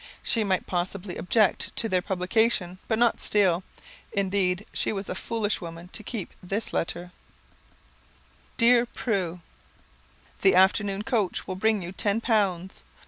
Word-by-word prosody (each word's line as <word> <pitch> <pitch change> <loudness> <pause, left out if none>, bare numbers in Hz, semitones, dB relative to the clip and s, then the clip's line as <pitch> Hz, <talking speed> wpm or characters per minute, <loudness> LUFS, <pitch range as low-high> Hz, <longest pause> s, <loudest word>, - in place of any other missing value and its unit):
She 225 - +2
might 190 -2 0
possibly 180 +1 -3
object 210 +2 +1
to 225 - -1
their 185 -4 +1
publication, 185 0 0
but 220 - +1
not 235 0 +3
Steele! 190 -4 +2 0.5
Indeed, 195 -1 0
she - - 0
was 200 -2 -4
a - - -1
foolish 215 +2 -2
woman 170 0 -8
to 215 - -5
keep 210 -3 -5
this 195 +4 -3
letter: 175 +1 -2 1.5
"Dear 240 0 +5
Prue: 185 -8 -2 1.0
"The 195 - +5
afternoon 195 +2 +3
coach 215 -6 0
will 185 - -4
bring 215 0 +1
you 175 - -6
ten 205 +3 0
pounds. 195 -6 0
195 Hz, 140 wpm, -26 LUFS, 180-220 Hz, 1.5 s, Dear